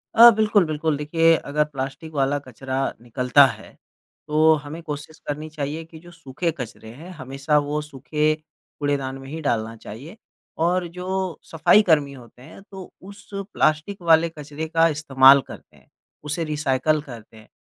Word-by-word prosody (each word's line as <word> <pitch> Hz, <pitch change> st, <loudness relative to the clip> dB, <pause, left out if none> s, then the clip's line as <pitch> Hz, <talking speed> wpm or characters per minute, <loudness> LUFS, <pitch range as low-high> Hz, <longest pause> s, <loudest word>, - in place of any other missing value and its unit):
अ, 235 Hz, +1 st, +10 dB
बिल्कुल, 210 Hz, -3 st, +3 dB
बिल्कुल 155 Hz, -1 st, -1 dB
देखिए 165 Hz, +2 st, +3 dB
अगर 150 Hz, +1 st, +2 dB
प्लास्टिक 140 Hz, +2 st, -6 dB
वाला 140 Hz, 0 st, +1 dB
कचरा 130 Hz, +1 st, -6 dB, 0.2 s
निकलता 125 Hz, +3 st, +4 dB
है, 135 Hz, -, -6 dB, 0.6 s
तो 155 Hz, +1 st, +4 dB
हमें 150 Hz, +3 st, -8 dB
कोशिश 150 Hz, 0 st, -7 dB
करनी 150 Hz, +2 st, -4 dB
चाहिए 155 Hz, +1 st, -5 dB
कि 160 Hz, -1 st, -14 dB
जो 175 Hz, +1 st, -15 dB
सूखे 165 Hz, 0 st, -4 dB
कचरे 115 Hz, -3 st, -8 dB
हैं, 165 Hz, +8 st, -11 dB
हमेशा 135 Hz, +3 st, -1 dB
वह 150 Hz, +1 st, -1 dB
सूखे 150 Hz, +1 st, -1 dB, 0.5 s
कूड़ेदान 140 Hz, -2 st, -2 dB
में 135 Hz, 0 st, -11 dB
ही 160 Hz, +3 st, -6 dB
डालना 115 Hz, -6 st, -1 dB
चाहिए 130 Hz, -, -11 dB, 0.5 s
और 180 Hz, 0 st, +1 dB
जो 185 Hz, -1 st, -3 dB
सफाई 165 Hz, +6 st, +5 dB
कर्मी 145 Hz, -4 st, +3 dB
होते 125 Hz, -2 st, -15 dB
हैं 155 Hz, +8 st, -13 dB
तो 190 Hz, -2 st, -10 dB, 0.2 s
उस 200 Hz, -, -16 dB
प्लास्टिक 195 Hz, -2 st, -1 dB
वाले 165 Hz, -1 st, +4 dB
कचरे 150 Hz, 0 st, -7 dB
का 165 Hz, +1 st, +3 dB
इस्तेमाल 140 Hz, -3 st, +5 dB
करते -, -, -13 dB
हैं। -, -, -25 dB, 0.4 s
उसे 150 Hz, +3 st, -2 dB
रिसाइकल 150 Hz, -1 st, 0 dB
करते 115 Hz, -5 st, -12 dB
हैं। 110 Hz, -, -16 dB
150 Hz, 160 wpm, -23 LUFS, 135-165 Hz, 0.6 s, अ